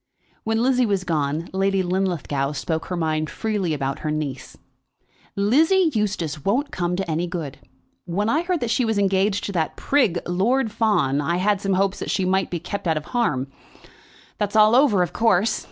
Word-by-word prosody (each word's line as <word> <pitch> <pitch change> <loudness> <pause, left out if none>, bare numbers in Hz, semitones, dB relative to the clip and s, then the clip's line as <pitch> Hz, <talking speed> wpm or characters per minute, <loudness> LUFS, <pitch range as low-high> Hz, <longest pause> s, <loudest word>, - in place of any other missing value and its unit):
When 225 +1 0
Lizzie 255 -1 +3
was 200 -3 0
gone, 155 -1 -1
Lady 195 0 +1
Linlithgow 175 -7 -1
spoke 160 +2 -3
her 180 - -3
mind 155 -2 -1
freely 210 -6 -2
about 135 -2 -2
her 155 - -3
niece. 150 -4 -4 0.8
"Lizzie 320 - +3
Eustace 185 - -2
won't 255 +9 0
come 175 -1 -1
to 190 0 -3
any 165 +2 -1
good. 160 -6 -5 0.5
When 190 +4 -1
I 300 +8 +2
heard 350 -1 -1
that 235 -2 -1
she 255 - +2
was 220 -2 0
engaged 195 0 +1
to - - -3
that 165 -5 -1
prig, 240 -12 +2
Lord 220 +7 +1
Fawn, 175 - +1
I 170 +4 0
had 200 +1 +1
some 195 -1 0
hopes 195 +1 +1
that - - -5
she 190 - 0
might 190 +1 +1
be 175 - -3
kept 180 +3 -5
out 160 -1 +1
of 155 - -5
harm. 140 - 0 0.9
That's 205 0 -2
all 215 +1 +6
over, 245 -9 +4
of 175 0 -5
course. 225 -2 +2
190 Hz, 185 wpm, -22 LUFS, 160-220 Hz, 0.9 s, all